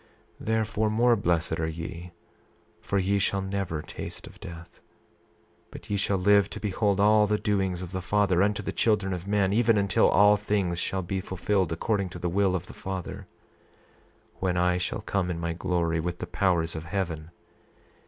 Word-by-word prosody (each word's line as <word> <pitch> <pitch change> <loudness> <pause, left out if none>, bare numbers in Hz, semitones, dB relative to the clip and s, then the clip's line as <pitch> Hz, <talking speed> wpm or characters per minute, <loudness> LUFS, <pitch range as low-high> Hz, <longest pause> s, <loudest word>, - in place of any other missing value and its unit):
28:7 - - -10
Therefore, 110 -1 +1
more 120 +2 +4
blessed 85 -5 0
are 80 - 0
ye, 85 +2 -6 0.7
for 100 - -1
ye 100 +1 +2
shall 100 0 0
never 95 -5 -3
taste - - -7
of - - -14
death; 85 0 -10 0.9
but - - -10
ye - - +2
shall 100 0 +1
live 100 +1 +4
to - - -7
behold 100 -1 0
all 105 +1 +5
the 105 +1 +1
doings 95 -4 -1
of 90 - -8
the 95 0 -3
Father 95 -1 +2
unto 105 +1 +1
the - - -3
children 105 -4 +1
of 90 +1 -6
men, 100 -1 +2
even 115 0 +4
until 100 -1 +3
all 105 +1 +6
things 100 -4 -1
shall 95 +1 -2
be 95 +2 -2
fulfilled 95 -1 -1
according 100 +3 -1
to 90 - -8
the 90 0 -2
will 95 +1 +2
of 90 -1 -3
the - - -10
Father, 95 -2 -6 1.1
when 90 -2 0
I 90 0 +2
shall - - -3
come 95 -3 -1
in 85 -2 -3
my 85 0 -2
glory 85 -1 0
with 90 +2 -3
the - - -5
powers 85 -2 0
of 80 0 -5
heaven. 85 -4 -3
95 Hz, 185 wpm, -27 LUFS, 85-100 Hz, 1.1 s, all